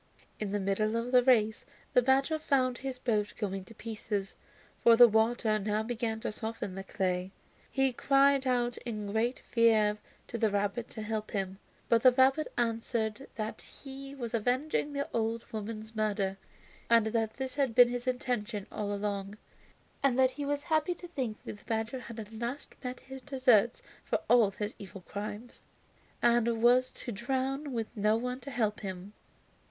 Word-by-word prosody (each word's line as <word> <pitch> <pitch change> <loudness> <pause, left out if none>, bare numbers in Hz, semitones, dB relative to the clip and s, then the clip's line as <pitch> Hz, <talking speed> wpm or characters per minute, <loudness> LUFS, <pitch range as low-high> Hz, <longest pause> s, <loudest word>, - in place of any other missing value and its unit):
In 210 -2 -3
the 205 - 0
middle 200 +3 0
of 230 +2 -2
the 250 -1 +7
race 220 -4 +3 0.3
the 250 - +6
badger 270 +5 +2
found 260 -5 +1
his 265 -1 -4
boat 215 -5 -1
going 195 -3 -3
to 230 - -14
pieces, 210 -3 -4 0.5
for 235 - +7
the 240 +1 +9
water 220 0 +2
now 210 +1 0
began 225 -1 -2
to - - -2
soften 220 -3 -5
the 195 +1 -6
clay. 185 -2 -1 0.4
He 270 -1 +1
cried 275 +1 +3
out 245 -1 +1
in 210 -4 -5
great 230 +4 +1
fear 220 -3 +3 0.3
to 235 - -5
the 220 - +3
rabbit 205 +3 -1
to 220 - -6
help 215 0 -3
him. 195 -2 -3 0.3
But 230 -1 +4
the 255 - +8
rabbit 265 +4 +3
answered 230 0 -1
that 220 -1 -4
he 275 0 -9
was 240 -3 -5
avenging 260 +6 0
the 280 0 -2
old 230 0 -1
woman's 220 +1 -5
murder, 200 -3 0 0.5
and 230 -2 +6
that 220 0 -1
this 265 -1 -4
had 270 -5 +1
been 245 -1 +8
his 245 +1 -4
intention 240 -5 -2
all 205 -1 -3
along, 200 0 -3 0.6
and 270 -3 +2
that 260 0 +5
he 290 +2 -5
was 285 0 -1
happy 315 +2 +1
to 350 - -10
think 250 -10 -4
that 205 - -7
the - - -22
badger 225 +3 -2
had 235 -2 -9
at 215 0 -8
last 235 +5 -5
met 250 0 -5
his 265 0 -9
deserts 255 -5 +3 0.2
for - - 0
all 235 -4 +6
his 210 +2 -4
evil 195 -1 -9
crimes, 210 +5 -7 0.6
and 235 -1 +3
was 250 +1 +5
to 240 - -6
drown 265 +6 -2
with 225 -3 -4
no 210 +1 +3
one 250 +2 -3
to 260 - -9
help 220 -5 0
him. 190 0 -6
230 Hz, 175 wpm, -31 LUFS, 210-255 Hz, 0.6 s, the